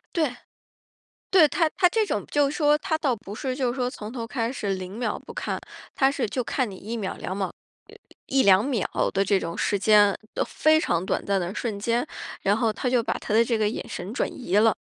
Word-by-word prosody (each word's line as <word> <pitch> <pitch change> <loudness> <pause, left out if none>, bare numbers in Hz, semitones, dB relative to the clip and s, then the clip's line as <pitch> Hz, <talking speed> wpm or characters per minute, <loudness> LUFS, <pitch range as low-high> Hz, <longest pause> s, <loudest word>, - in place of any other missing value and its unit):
对。 295 -7 +1 0.9
对， 360 -5 +7
他 325 0 +2
他 360 -2 +5
这 435 +3 +1
种 - - -2
就 285 -1 +3
是 - - -5
说， 300 -2 +4
他 315 -2 -1
倒 280 -6 +1
不 205 -1 -9
是 260 +2 -3
就 255 -3 0
是 250 - -5
说 250 -1 0
从 215 -5 -8
头 235 -2 -5
开 230 -1 -2
始， 205 -7 -2
0 185 +2 -6
秒 235 -3 -2
不 465 - -12
看。 - - -3 0.3
他 270 -1 +3
是 275 -4 -1
就 250 +4 -2
看 250 0 -1
你 190 - -9
1 225 +5 -5
秒、 200 -4 -3
2 185 - -4
秒、 190 -2 -2 0.7
1-2 210 -5 +4
秒 250 -8 0 0.3
的 195 - +2
这 195 0 +2
种 170 0 -5
时 205 - 0
间， 210 0 +6 0.3
呃， - - +1
非 310 0 +3
常 175 - 0
短 - - -1
暂 200 -1 +1
的 175 +2 -3
瞬 215 -4 -3
间， 235 +6 0 0.4
然 200 +2 +2
后 225 -3 +1
他 250 - -2
就 245 -2 +3
把 - - -1
他 210 - -4
的 230 +1 +6
这 230 -1 +1
个 210 -1 +2
眼 - - -5
神 190 +6 -6
转 - - 0
移 205 -6 -1
了。 220 -1 +5
230 Hz, 235 characters per minute, -25 LUFS, 200-275 Hz, 0.9 s, 对